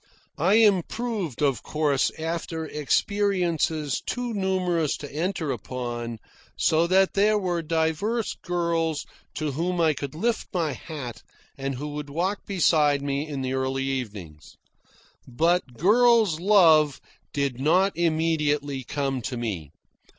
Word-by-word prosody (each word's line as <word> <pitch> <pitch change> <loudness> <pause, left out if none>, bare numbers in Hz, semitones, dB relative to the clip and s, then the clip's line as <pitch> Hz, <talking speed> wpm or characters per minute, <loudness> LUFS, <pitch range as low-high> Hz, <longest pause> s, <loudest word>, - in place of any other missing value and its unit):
I 185 +7 +4
improved, 210 - +1
of 135 -4 +1
course, 150 -3 +1
after 165 0 -3
experiences 165 -2 0
too 245 -1 -3
numerous 185 -5 0
to 145 -2 -9
enter 165 -2 -1
upon, 120 -1 -5 0.4
so 165 +2 +3
that 190 +1 +3
there 210 +2 +3
were 180 -4 -1
divers 165 +8 -1
girls 170 -3 -1 0.3
to 155 -2 -2
whom 175 +5 -2
I 160 -2 +4
could 140 0 -6
lift 230 +7 -1
my 165 -4 +1
hat 130 -5 -7 0.3
and 135 0 -3
who 145 +4 -5
would 145 0 -6
walk 180 +7 -2
beside 150 -7 +3
me 140 +2 -2
in 140 -3 -4
the 130 0 -2
early 130 0 -1
evenings. 105 - -5 0.7
But 155 0 0
girl's 220 - +4
love 165 -7 +5 0.3
did 140 -3 -1
not 180 +8 +3
immediately 150 -4 0
come 135 0 -2
to 125 +1 -4
me. 100 -11 -4
160 Hz, 130 wpm, -25 LUFS, 140-180 Hz, 0.7 s, love